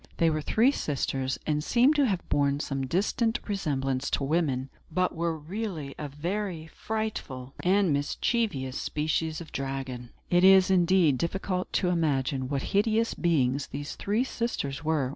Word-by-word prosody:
They 165 -1 +3
were 155 0 -1
three 230 - +3
sisters, 135 - -2
and 150 -1 0
seem 250 - +4
to 290 -3 +3
have 190 -5 -2
borne 140 0 +1
some 135 -2 -2
distant 220 - +1
resemblance 140 -9 -1
to - - 0
women, 135 -3 0 0.2
but 185 +3 +1
were 165 0 -1
really 160 -3 -5
a 150 - -3
very 170 +3 -3
frightful 160 -10 -4
and 190 -2 +3
mischievous 145 - -1
species 155 +1 -1
of 160 - -10
dragon. 135 -3 -4 0.2
It 175 0 +4
is, 190 0 +7
indeed, 175 -6 +4
difficult 185 +1 -2
to 180 - +2
imagine 135 -6 0
what 140 -2 -1
hideous 220 +3 +2
beings 140 -5 +1
these 145 +1 -5
three 210 +5 0
sisters 160 - -3
were. 155 -5 +1
160 Hz, 150 wpm, -28 LUFS, 140-195 Hz, 0.2 s, is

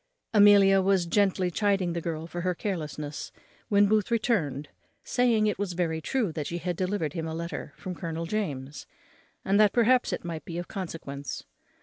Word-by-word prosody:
Amelia 200 -2 +7
was 190 -2 +2
gently 185 0 +1
chiding 195 -2 +1
the 170 - -3
girl 160 -1 -4
for 175 +1 -5
her 180 0 0
carelessness 155 -6 -4 0.4
when 205 0 +5
Booth 210 -1 +2
returned, 180 - 0 0.3
saying 235 -4 +2
it 210 -2 0
was 200 -3 -2
very 165 -2 -1
true 235 -1 0
that 155 -2 -4
she 175 - -3
had 175 0 -3
delivered 185 -3 -1
him 165 -2 -3
a 160 - -4
letter 170 +1 -5
from 185 - -6
Colonel 165 -1 -4
James, 150 -8 -4 0.6
and 200 +2 +3
that 210 -2 +5
perhaps 245 +1 +3
it - - -4
might 165 -3 -5
be 170 - -6
of 175 - -4
consequence. 140 -8 -6
180 Hz, 180 wpm, -27 LUFS, 160-205 Hz, 0.6 s, Amelia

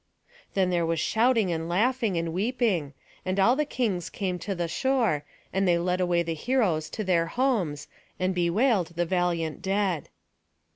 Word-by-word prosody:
Then 185 -2 +2
there 175 -1 +1
was 165 0 0
shouting 225 -1 +2
and 165 0 -3
laughing, 225 +1 +1
and 165 -1 -2
weeping; 195 - 0 0.3
and 185 +1 -1
all 235 +6 +5
the 300 +2 +1
kings 215 - -2
came 185 -3 -3
to 195 +1 -3
the 175 -1 -2
shore, 225 - +1 0.3
and 195 0 +1
they 175 -1 +4
led 180 +1 0
away 175 -1 +2
the 165 -1 -2
heroes 175 -5 0
to 215 - -1
their 170 -3 +2
homes, 190 - 0 0.3
and 185 +1 +1
bewailed 180 +1 +1
the 175 +1 +1
valiant 170 -3 -1
dead. 195 -5 -1
185 Hz, 165 wpm, -27 LUFS, 170-220 Hz, 0.3 s, all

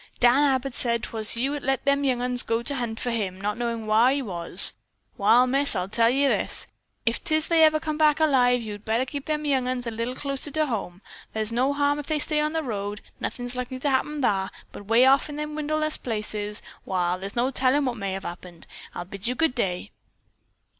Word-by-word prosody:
"Dan 245 +3 +5
Abbott 270 -2 +1
said 235 -2 +1
'twas 220 0 0
you 270 +4 0
as 290 - -4
let 270 +1 -1
them 280 0 +2
young 250 -3 0
'uns 250 0 +1
go 230 +1 -1
to 285 - 0
hunt 235 -4 -3
for 245 - -2
him, 195 -5 -2
not 205 +1 -2
knowin' 230 -1 -3
whar 220 +3 +4
he 280 +2 +1
was. 175 -9 +4 0.4
Wall, 230 +5 +5
Miss, 275 +3 +2
I'll 180 0 -1
tell 230 +2 +3
ye 275 +2 +2
this: - - 0 0.4
If 230 0 0
'tis 315 -2 +1
they 330 -1 +5
ever 310 0 +5
come 310 -1 -4
back 305 -1 +4
alive, 250 -5 +3
yo'd 205 -1 -7
better 225 +4 0
keep 280 +1 -6
them 305 -1 -2
young 265 -3 +1
'uns 255 -1 -2
a 235 - -3
little 230 +3 -3
closer 275 +1 -3
to 310 +2 0
home. 200 -7 -5 0.3
Thar's 220 0 0
no 255 +4 +1
harm 285 0 +1
if 290 - -7
they 310 - 0
stay 300 0 0
on 305 +1 -1
the 320 -1 -1
road. 205 -4 -4 0.2
Nothin's 245 0 -5
likely 250 +1 -4
to 280 +2 -1
happen 285 +2 -1
thar, 195 -4 +1 0.2
but 205 - -11
'way 230 +3 +5
off 275 +3 +4
in 295 - -6
the 300 0 -3
wilderness 310 0 -2
places, 210 -2 -3 0.2
wall, 180 -1 -1
thar's 195 +2 -7
no 245 +3 +1
tellin' 270 +2 +2
what 250 -2 -1
may 200 -3 -3
have 195 0 -5
happened. 175 -1 -9 0.3
I'll 175 - -5
bid 195 +3 -7
you 250 - -1
good 320 0 +1
day." 195 -4 -2
250 Hz, 225 wpm, -25 LUFS, 215-285 Hz, 0.4 s, Dan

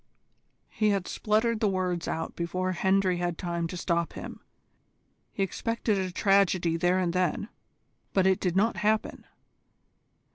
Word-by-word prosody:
He 215 -1 +1
had 200 -3 0
spluttered 220 +1 +1
the 215 - +2
words 180 -2 -1
out 160 0 -3
before 185 +2 -2
Hendry 190 0 +2
had 175 -1 -2
time 170 -2 -2
to 180 - -6
stop 170 -1 -1
him. - - -8 0.9
He 195 - -1
expected 220 +2 -1
a 185 -1 -2
tragedy 185 -3 +2
there 175 +2 +2
and 180 -2 0
then, 185 +3 0 0.6
but 190 -1 +2
it 190 -1 +3
did 180 -2 -1
not 215 +4 +2
happen. 215 +1 0
185 Hz, 145 wpm, -28 LUFS, 175-200 Hz, 0.9 s, it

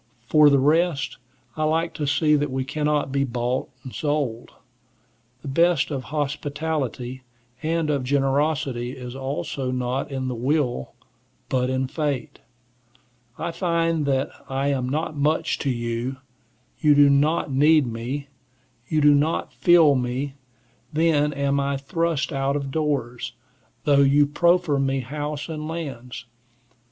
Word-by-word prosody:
For 150 +3 +6
the 140 - +4
rest, 150 +1 +1 0.4
I 155 - -1
like 165 +2 +1
to 150 - -3
see 150 +1 +3
that 145 0 0
we 130 0 -2
cannot 150 -1 0
be 140 0 +1
bought 125 0 -2
and 130 - -9
sold. 145 -6 -2 0.9
The - - -7
best 160 0 +2
of 135 -4 -3
hospitality 145 -3 -3 0.4
and 160 -1 0
of 140 -3 0
generosity 135 -2 0
is 125 0 -7
also 135 0 -3
not 125 +1 -2
in 135 -2 -3
the 130 - -2
will, 125 - -1 0.6
but 125 -1 +1
in 130 0 0
fate. 140 -3 -3 1.0
I 170 - -3
find 165 -3 0
that 135 -1 0 0.2
I 135 +1 0
am 130 -3 -1
not 155 +2 -2
much 150 +2 0
to 140 - -1
you; 120 +1 -2 0.6
you 150 -2 +5
do 145 0 +7
not 145 +2 +2
need 150 +2 +5
me; 120 +5 -4 0.6
you 155 -1 +2
do 145 0 +6
not 150 +3 0
feel 170 -4 +5
me; 130 +2 -2 0.6
then 150 -2 +2
am 140 0 0
I 140 0 0
thrust 165 +2 -1
out 135 0 0
of 140 -2 -3
doors, 140 -6 -2 0.5
though 145 -3 +4
you 140 +1 +5
proffer 170 0 +2
me 135 0 0
house 145 +3 -4
and 155 -2 -5
lands. 130 -7 -6
140 Hz, 140 wpm, -24 LUFS, 130-155 Hz, 1.0 s, do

